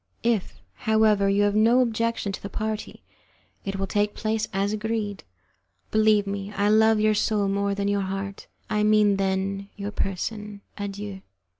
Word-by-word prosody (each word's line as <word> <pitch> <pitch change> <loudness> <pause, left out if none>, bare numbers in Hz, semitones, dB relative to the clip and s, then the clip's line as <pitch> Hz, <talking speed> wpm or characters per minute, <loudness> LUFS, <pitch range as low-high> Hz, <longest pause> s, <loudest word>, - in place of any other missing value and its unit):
If, 230 -5 0
however, 215 -2 +3
you 200 +1 +3
have 205 0 +2
no 225 +4 +4
objection 230 -3 0
to 195 - -6
the 200 - -6
party, 215 0 -4 0.6
it 195 0 -3
will 195 0 -1
take 205 +2 0
place 220 0 -1
as 195 +2 0
agreed. 215 -2 -3 0.7
Believe 215 -1 +4
me, 200 0 -4
I 205 +1 +1
love 220 0 +5
your 215 0 +3
soul 210 -1 +1
more 200 0 0
than 200 0 -1
your 200 0 +1
heart 195 +1 -5 0.2
I 210 - 0
mean 210 -1 +4
than 195 +1 -1
your 200 0 -5
person. 210 +1 -3
Adieu." 200 -1 -6
205 Hz, 160 wpm, -25 LUFS, 200-215 Hz, 0.7 s, love